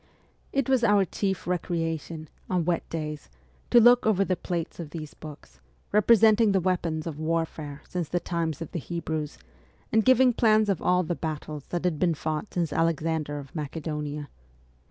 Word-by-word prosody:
It 275 -2 0
was 260 -3 +2
our 205 -3 +4
chief 190 +1 -2
recreation, 165 -2 -3 0.2
on 180 -3 +1
wet 175 -1 -1
days, 150 -2 -5 0.4
to 240 - +7
look 240 0 +6
over 195 -2 +3
the 185 - 0
plates 170 -2 -4
of 165 -3 -6
these 155 -1 -7
books, 145 - -12 0.3
representing 215 0 +5
the 190 - +3
weapons 175 -3 -1
of 155 -3 -5
war 165 +1 +1
fare 150 -2 -9
since 175 -4 -3
the 175 - 0
times 165 -2 -2
of 165 - -11
the 175 - -3
Hebrews, 160 -1 -4 0.5
and 220 0 +4
giving 255 0 +5
plans 215 -2 +3
of 195 - 0
all 180 0 +3
the 175 - -2
battles 155 -3 -5
that 175 -1 -3
had 165 -4 0
been 170 -3 +2
fought 155 +6 -3
since 170 -4 0
Alexander 160 -2 0
of 140 -2 -9
Macedonia. 150 -1 -4
165 Hz, 175 wpm, -27 LUFS, 155-190 Hz, 0.5 s, to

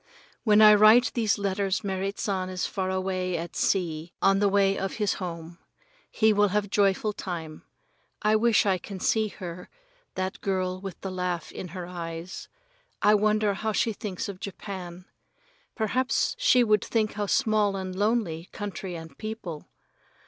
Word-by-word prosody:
When 215 -1 +6
I 210 0 +10
write 215 +4 +6
these 225 -4 +1
letters 200 -1 -1
Merrit 195 0 -2
San 185 -2 -2
is 185 -1 -2
far 185 -1 -2
away 185 -1 -1
at 170 +1 -6
sea 170 -3 0
on 195 0 +3
the 205 0 +3
way 195 0 +3
of 195 0 -3
his 210 -3 0
home. 170 -1 -6 0.5
He 220 -1 +3
will 205 0 +4
have 205 0 -1
joyful 205 +1 +2
time. 165 -6 -6 0.6
I 215 +1 +4
wish 225 0 +3
I 190 -2 +2
can 195 +1 -8
see 220 +3 +2
her, 180 -3 -8 0.5
that 185 +1 -3
girl 185 -1 -1
with 195 -3 -7
the 190 - -4
laugh 180 -2 -3
in 185 - -7
her 180 +1 -7
eyes. 170 0 -7 0.6
Wonder 210 0 +3
how 215 +2 -2
she 225 +2 +1
thinks 200 -3 -5
of 195 -2 -7
Japan. 185 -3 -7 0.7
Perhaps 250 +3 0
she 375 - +5
would 210 -3 +3
think 220 -2 0
how 205 -1 -2
small 215 -4 +2
and 185 -1 -4
lonely 200 -5 0
country 195 -3 -5
and 160 -3 -9
people. 215 -8 -6
195 Hz, 160 wpm, -27 LUFS, 180-210 Hz, 0.7 s, I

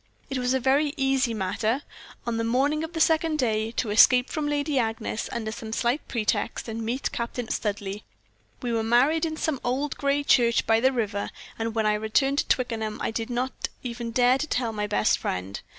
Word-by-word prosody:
It 265 - -1
was 250 +1 +1
a - - +2
very 280 +4 +2
easy 270 -2 +2
matter, 220 +5 -1 0.4
on 235 -1 -1
the 230 - 0
morning 275 +7 +1
of 320 +1 -6
the 325 - -3
second 320 -1 +3
day, 220 -5 0
to 230 -3 -1
escape 250 +4 +6
from 305 -3 -1
Lady 290 -1 0
Agnes, 225 -1 -2
under 220 -2 -3
some 220 0 -7
slight 240 +5 0
pretext, 230 0 -1
and 225 0 -4
meet 245 +4 -2
Captain 235 0 -4
Studleigh. 205 -1 -2 0.6
We 240 -1 -1
were 225 - +1
married 260 +9 +3
in 315 0 -5
some 310 -5 -1
old 265 +4 -1
gray 280 +1 +1
church 235 -4 +3
by 225 0 +4
the 260 +3 +3
river; 210 -5 -2 0.3
and 225 0 -2
when 220 -1 +1
I 210 - +3
returned 245 +7 +1
to - - 0
Twickenham 220 -4 -1
I - - -1
did 225 +1 -3
not 250 +2 -2
even 235 -1 -4
dare 245 +2 +3
to 310 - -2
tell 240 -5 -1
my 210 -1 -2
best 210 +1 +2
friend. 95 +2 -4
240 Hz, 200 wpm, -26 LUFS, 220-270 Hz, 0.6 s, escape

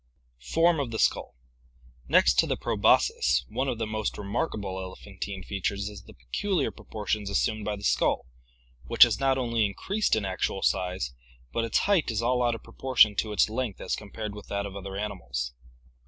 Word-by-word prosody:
Form 165 - +2
of 135 -4 -1
the 115 - -4
Skull. - - +1 0.4
— - - -34 0.3
Next - - +5
to - - +4
the - - -1
proboscis, 65 0 +2
one 135 - -1
of 120 - -1
the 110 - -1
most 110 -1 -3
re 105 - -6
markable 100 -4 -2
elephantine 95 +1 -7
features 100 +2 -2
is 105 -2 -10
the - - -14
peculiar 145 - -1
proportions 105 -1 -4
assumed 110 +1 0
by 105 - -1
the 100 - -11
skull, - - +2 0.6
which - - +8
has - - +3
not 135 -1 +2
only 115 -3 +1
increased 190 - 0
in 110 -2 -1
actual 95 0 -2
size, 90 -9 0 0.4
but 115 - 0
its 115 - +1
height 195 -9 +2
is 115 0 -1
all 125 +1 +2
out 120 -1 +2
of - - -10
proportion 125 -5 +3
to 110 - 0
its 105 - +3
length 115 -2 -3
as - - -2
compared 105 0 -6
with 105 0 -10
that 100 0 -2
of 100 -1 -7
other 100 0 -6
animals. 65 -13 -4
105 Hz, 190 wpm, -27 LUFS, 95-115 Hz, 0.6 s, which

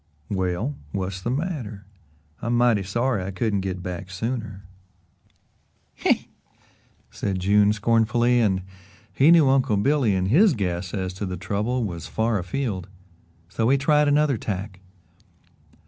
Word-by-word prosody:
"Well, 95 +8 -1 0.2
what's 95 -1 -3
the 120 - -3
matter? 125 - -4 0.6
I'm 120 +2 0
mighty 120 -4 +3
sorry 115 +2 -1
I 95 - -4
couldn't 100 +2 -1
get 95 -2 -4
back 90 +1 -6
sooner." 110 0 -4 1.3
"Huh!" - - +4 1.0
said 95 -2 -3
June 100 +2 +4
scornfully, 115 +3 +2
and 95 -5 +1 0.5
he 140 +4 +4
knew 165 -4 +6
Uncle 130 -6 +3
Billy 125 -2 +2
in 95 0 0
his 165 - +5
guess 90 -3 -3
as 95 -2 -3
to 100 +2 -5
the 90 0 -4
trouble 110 +7 -1
was 85 -6 -5
far 110 -1 0
afield, 95 0 -3
and 90 -2 -28
so 115 +1 +1
he 140 - +4
tried 150 +2 +3
another 145 -4 +2
tack. 95 -1 -5
105 Hz, 140 wpm, -24 LUFS, 95-125 Hz, 1.3 s, knew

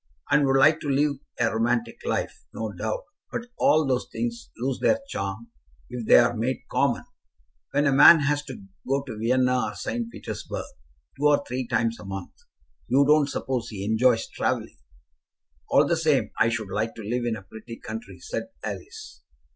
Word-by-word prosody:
"And 145 -2 +4
would 135 0 +3
like 155 +4 +5
to 145 - -4
live 140 +1 +2 0.2
a 115 -2 +2
romantic 115 0 0
life, - - -2
no 110 -1 -3
doubt; 110 +3 -3 0.3
but 235 - -4
all 155 0 +4
those 130 -2 0
things 235 0 -4
lose 130 +2 -2
their 270 - +3
charm 105 - -5 0.4
if 120 -2 -5
they - - +8
are 120 0 +4
made 120 +3 -2
common. - - +1 0.7
When 145 +1 +1
a 140 - +4
man 150 +4 +9
has 145 +1 +1
to 130 -7 -9 0.2
go 135 +1 +1
to 115 -6 -8
Vienna 125 +1 +2
or 105 - -5
St. 115 0 -3
Petersburg - - -6 0.5
two 145 - +4
or 145 -1 +3
three 125 0 -3
times 115 -1 0
a - - -10
month, 95 -1 -6 0.5
you 140 +2 +4
don't 150 -1 +4
suppose 130 -5 -3
he 100 -3 -5
enjoys 115 +2 +3
travelling?" - - -2 0.9
"All - - +5
the - - +2
same, - - +1
I 115 - +5
should 110 -4 -3
like 110 +3 -2
to 110 - -8
live 120 +3 -2
in 115 - 0
a 95 - -9
pretty 110 +4 -10
country," 225 - -8
said 455 +3 -4 0.2
Alice. 430 +3 -7
125 Hz, 180 wpm, -25 LUFS, 115-140 Hz, 0.9 s, man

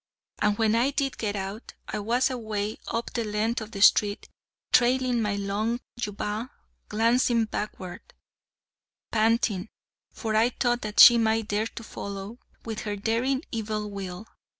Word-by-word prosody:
And 210 0 +2
when 220 -1 +2
I 235 +4 +3
did 275 -1 -2
get 210 -2 -2
out, 195 +3 -6
I - - -3
was 240 +6 +1
away 215 -3 -3
up 230 +1 -3
the 235 - -1
length 220 +2 -1
of 220 - -7
the 200 -3 0
street, 205 0 +4 0.5
trailing 250 -1 +3
my 210 -2 0
long 205 +4 -1 0.2
jubbah, 210 +2 -3 0.4
glancing 230 +1 +2
backward, 200 -4 -5 1.1
panting, 220 -3 +1 0.4
for 220 -2 -3
I 225 +3 +4
thought 240 0 0
that 210 -1 -3
she 240 -1 +10
might 220 -1 +1
dare 210 +2 0
to 230 - -9
follow, 200 +2 -7 0.3
with 220 -2 -4
her 210 -1 -3
daring 235 - 0
evil 215 -2 -3
will. 195 0 -6
220 Hz, 150 wpm, -26 LUFS, 210-235 Hz, 1.1 s, she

